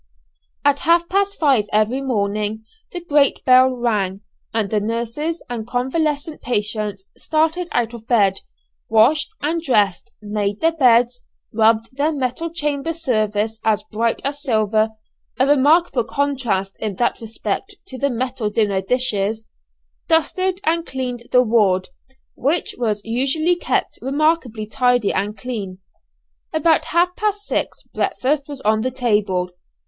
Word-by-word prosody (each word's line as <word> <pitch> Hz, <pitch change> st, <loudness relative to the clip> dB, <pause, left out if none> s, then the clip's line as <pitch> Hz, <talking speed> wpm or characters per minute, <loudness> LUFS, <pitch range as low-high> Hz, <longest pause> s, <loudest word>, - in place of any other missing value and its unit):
At 285 Hz, 0 st, +4 dB
half 340 Hz, +1 st, +3 dB
past 400 Hz, +1 st, +1 dB
five 270 Hz, -9 st, +3 dB
every 215 Hz, +5 st, +1 dB
morning 215 Hz, -3 st, -2 dB, 0.3 s
the 350 Hz, -1 st, -7 dB
great 290 Hz, -3 st, +2 dB
bell 255 Hz, 0 st, +7 dB
rang, 210 Hz, -6 st, -1 dB, 0.3 s
and 220 Hz, -3 st, -1 dB
the 215 Hz, -, +2 dB
nurses 235 Hz, +10 st, -3 dB
and 235 Hz, -2 st, -5 dB
convalescent 290 Hz, +5 st, -1 dB
patients 210 Hz, -4 st, -2 dB
started 320 Hz, +3 st, 0 dB
out 235 Hz, -1 st, 0 dB
of 230 Hz, -1 st, -10 dB
bed, 200 Hz, -5 st, +3 dB, 0.5 s
washed 230 Hz, +7 st, +4 dB
and 325 Hz, +3 st, 0 dB
dressed, 210 Hz, -, +1 dB
made 205 Hz, -1 st, -2 dB
their 325 Hz, +1 st, +3 dB
beds, 245 Hz, -3 st, +4 dB, 0.3 s
rubbed 225 Hz, +2 st, +2 dB
their 290 Hz, +3 st, +1 dB
metal 275 Hz, +3 st, -2 dB
chamber 300 Hz, -1 st, -2 dB
service 220 Hz, -7 st, -1 dB
as 215 Hz, -1 st, +1 dB
bright 230 Hz, +1 st, 0 dB
as 285 Hz, +1 st, -3 dB
silver 220 Hz, -4 st, +1 dB, 0.5 s
a 260 Hz, -, +3 dB
remarkable 290 Hz, 0 st, +3 dB
contrast 240 Hz, -7 st, -1 dB
in 210 Hz, -3 st, -3 dB
that 240 Hz, +4 st, 0 dB
respect 225 Hz, -, -4 dB
to 260 Hz, -8 st, -9 dB
the 280 Hz, -, +1 dB
metal 250 Hz, -2 st, -2 dB
dinner 205 Hz, -3 st, +1 dB
dishes 220 Hz, -1 st, -1 dB, 0.6 s
dusted 365 Hz, +3 st, +1 dB
and 335 Hz, +1 st, +1 dB
cleaned 250 Hz, -2 st, -4 dB
the 250 Hz, 0 st, +5 dB
ward, 205 Hz, -6 st, +2 dB, 0.4 s
which 295 Hz, +7 st, 0 dB
was 210 Hz, -4 st, -1 dB
usually 275 Hz, +9 st, +1 dB
kept 350 Hz, -, -1 dB
remarkably 275 Hz, -5 st, 0 dB
tidy 245 Hz, 0 st, +1 dB
and 205 Hz, +2 st, -2 dB
clean. 200 Hz, -5 st, -5 dB, 0.7 s
About 315 Hz, 0 st, +2 dB
half 350 Hz, +2 st, +1 dB
past 415 Hz, -1 st, -1 dB
six -, -, -2 dB
breakfast 280 Hz, +2 st, -1 dB
was 285 Hz, -2 st, -7 dB
on 215 Hz, +1 st, +2 dB
the 255 Hz, -, 0 dB
table. 210 Hz, -8 st, 0 dB
245 Hz, 135 wpm, -20 LUFS, 215-295 Hz, 0.7 s, bell